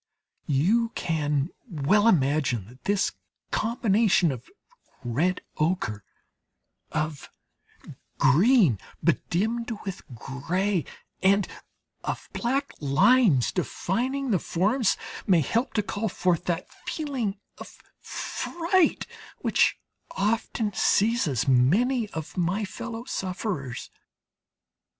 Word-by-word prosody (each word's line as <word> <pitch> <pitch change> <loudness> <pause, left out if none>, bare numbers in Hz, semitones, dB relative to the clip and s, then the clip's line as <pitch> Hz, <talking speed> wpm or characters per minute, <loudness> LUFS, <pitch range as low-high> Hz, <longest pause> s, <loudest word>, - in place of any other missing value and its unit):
You 200 - +2
can 150 -2 0 0.2
well 190 +7 +3
imagine 140 - +2
that 125 +2 -18
this 200 +1 +2 0.4
combination 215 - +2
of 125 -3 -8 0.5
red 155 +10 0 0.2
ochre, 150 - -1 0.9
of 155 -2 -3 0.9
green 165 - +5 0.2
bedimmed 230 +7 0 0.2
with 195 -2 -5
grey, 170 - -1 0.4
and 195 0 +4 0.6
of - - -4
black 270 +4 -1
lines, 155 - +4
defining 250 +9 -1
the 190 - +3
forms, 210 +9 +1 0.3
may 180 -5 +5
help 230 - 0
to 210 - +1
call 205 +2 -2
forth 175 -2 0
that 175 0 -1 0.2
feeling 260 -10 -2 0.2
of - - -11 0.2
fright 345 0 0 0.4
which - - +3 0.4
often 215 +1 0
seizes 195 - +2
many 210 - +3
of 160 -5 -7
my 185 +4 0
fellow 225 +4 -6
sufferers. 185 - -4
190 Hz, 95 wpm, -26 LUFS, 150-230 Hz, 0.9 s, green